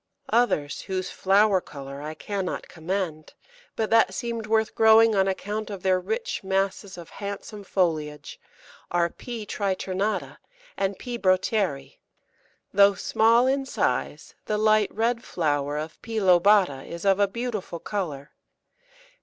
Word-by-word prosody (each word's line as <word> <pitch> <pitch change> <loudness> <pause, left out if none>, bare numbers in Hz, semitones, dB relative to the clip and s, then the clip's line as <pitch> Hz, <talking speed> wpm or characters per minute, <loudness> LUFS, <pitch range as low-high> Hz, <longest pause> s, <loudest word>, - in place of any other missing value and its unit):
Others 225 -12 +1
whose 185 -1 -4
flower 195 0 +3
colour 140 -2 -9
I 155 +1 -6
cannot 195 +2 -4
commend, 165 -2 -4 0.4
but 220 -1 -2
that 225 0 +4
seemed 235 -3 -4
worth 220 0 +1
growing 220 0 +6
on 195 -1 +2
account 210 +3 -3
of 195 -3 -7
their 185 -1 +3
rich 465 - -3
masses 195 0 -1
of 170 -2 -11
handsome 200 +1 -7
foliage, 155 -6 -2 0.5
are 170 -1 +1
P. 235 -3 -7
triternata 195 +1 -2 0.4
and 195 -1 -1
P. 240 -1 -6
Broteri. 185 -7 0 0.7
Though 200 0 +6
small 230 +5 +3
in 270 +1 +1
size, - - -2
the 210 - -1
light 215 -1 +3
red 235 +2 0
flower 145 -3 -1
of 155 +1 -6
P. 225 -1 -3
lobata 185 -6 +4
is 170 +2 -8
of 195 0 +4
a 200 - +4
beautiful 220 -5 -4
colour. 155 -7 -4
195 Hz, 135 wpm, -25 LUFS, 175-220 Hz, 0.7 s, growing